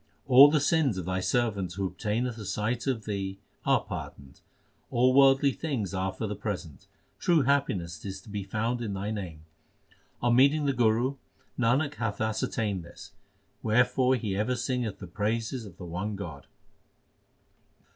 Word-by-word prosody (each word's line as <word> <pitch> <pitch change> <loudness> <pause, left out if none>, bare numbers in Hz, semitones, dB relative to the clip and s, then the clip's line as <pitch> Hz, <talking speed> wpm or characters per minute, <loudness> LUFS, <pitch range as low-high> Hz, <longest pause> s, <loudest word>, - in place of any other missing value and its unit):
All 135 +2 +9
the 150 +1 +3
sins 145 - +2
of 90 - -4
Thy 95 +1 -1
servant 100 -4 0
who 100 +1 -2
obtaineth 115 +5 -2
a 105 - -7
sight 110 +6 -2
of 120 -5 -1
Thee, 95 -2 -3 0.3
are - - +4
pardoned. 70 0 -8 0.5
All 125 +2 +3
worldly 135 0 +6
things 130 - -3
are 95 0 -1
for 110 - -5
the 105 0 -3
present; 100 -7 -6 0.3
true 165 -5 +3
happiness 95 - 0
is 95 -1 -5
to - - -15
be 105 0 -3
found 115 +5 -2
in 105 -4 -3
Thy 100 +2 -3
name. 85 -7 -6 0.7
On 120 0 +2
meeting 140 +4 +4
the 140 - +2
Guru, 120 +3 +2 0.4
Nanak 130 +5 +1
hath 115 -4 -2
ascertained 110 -3 -1
this; 85 +1 -12 0.5
wherefore 125 +3 +3
he 110 -5 -2
ever 110 +6 0
singeth 125 -4 -2
the 100 - -8
praises 110 +5 -2
of 90 -3 -14
the 90 - -8
one 95 +5 -3
God. 80 -8 -8
110 Hz, 160 wpm, -28 LUFS, 95-125 Hz, 0.7 s, All